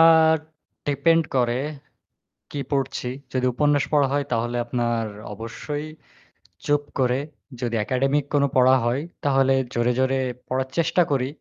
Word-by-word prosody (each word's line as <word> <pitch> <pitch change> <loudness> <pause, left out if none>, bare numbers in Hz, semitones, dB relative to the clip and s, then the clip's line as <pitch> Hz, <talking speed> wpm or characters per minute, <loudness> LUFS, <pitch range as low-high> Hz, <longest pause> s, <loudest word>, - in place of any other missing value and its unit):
আর 160 -1 +7 0.5
depend 160 +3 +3
করে 120 0 +2 0.9
কি 145 - -4
পড়ছি। 135 -2 -1 0.2
যদি 130 -1 +1
উপন্যাস 145 +1 +2
পড়া 145 -2 +4
হয় 145 0 +1
তাহলে 120 +1 0
আপনার 120 -1 -1 0.3
অবশ্যই 145 +8 -5 0.8
চুপ 145 0 +2 0.2
করে 125 0 +2 0.4
যদি 120 -1 -1
একাডেমিক 135 +3 +1
কোনো 140 -1 +4
পড়া 130 0 +6
হয় 125 +4 +1 0.2
তাহলে 135 -1 +4 0.2
জোরে, 120 +1 +2
জোরে 130 0 +2 0.3
পড়ার 130 0 -1
চেষ্টা 170 +2 +3
করি 130 -2 +1
135 Hz, 130 wpm, -24 LUFS, 125-145 Hz, 0.9 s, আর